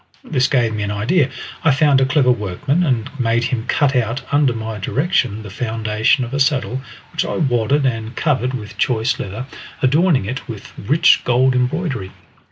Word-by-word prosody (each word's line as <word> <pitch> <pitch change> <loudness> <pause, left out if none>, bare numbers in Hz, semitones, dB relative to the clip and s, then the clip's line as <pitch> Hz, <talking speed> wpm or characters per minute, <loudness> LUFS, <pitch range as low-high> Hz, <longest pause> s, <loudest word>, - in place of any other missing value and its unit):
This 130 -5 +1
gave 120 -4 +1
me 105 - -3
an 100 - -2
idea. 125 - +1 0.3
I 160 - +4
found 140 -1 +4
a 130 - +3
clever 135 -2 +3
workman, 125 - -1
and 125 -8 0
made 115 -1 +1
him 120 -1 -2
cut 145 -2 +2
out 125 +2 0
under 145 -2 +3
my 110 -2 -5
direction 125 - 0
the 105 - -9
foundation 110 +2 0
of 120 - -9
a 140 - -1
saddle, 135 -2 +1 0.3
which - - -1
I - - -3
wadded 135 0 +1
and 115 -2 -2
covered 130 -5 0
with 105 -5 -8
choice 120 +1 +1
leather, 105 +7 -5 0.4
adorning 150 - +3
it 125 +6 -5
with 110 -5 -9
rich 155 +11 +3
gold 130 +1 +3
embroidery. 125 - -1
125 Hz, 175 wpm, -19 LUFS, 110-140 Hz, 0.4 s, I